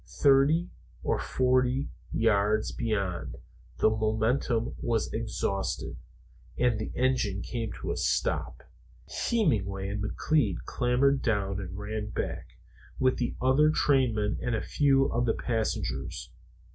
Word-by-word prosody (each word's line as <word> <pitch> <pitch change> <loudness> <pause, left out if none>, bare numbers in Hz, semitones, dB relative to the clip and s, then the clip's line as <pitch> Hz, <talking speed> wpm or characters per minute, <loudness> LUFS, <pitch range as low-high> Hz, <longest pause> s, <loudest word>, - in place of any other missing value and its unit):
Thirty 145 +5 +4 0.3
or - - 0
forty 130 +1 +1 0.2
yards 110 -1 +2
beyond, 100 -6 -2 0.4
the 110 - +4
momentum 110 +2 0
was 115 -2 -1
exhausted 105 -3 -2 0.6
and 120 -3 +2
the 110 - -4
engine 120 -7 +1
came 115 -3 -4
to - - -4
a - - -2
stop. - - -1 0.7
Hemenway 100 - +1
and 100 0 -3
McLeod 105 - +1
clambered 130 +3 +2
down 100 -4 0
and 95 -1 -6
ran 105 +1 -4
back, - - -5 0.4
with 130 0 +2
the 120 - -2
other 135 +4 +4
trainmen 125 -9 +2
and 125 -2 0
a - - -1
few 135 -2 +3
of 120 0 0
the 115 - +2
passengers. 110 - -3
115 Hz, 120 wpm, -28 LUFS, 105-130 Hz, 0.7 s, Thirty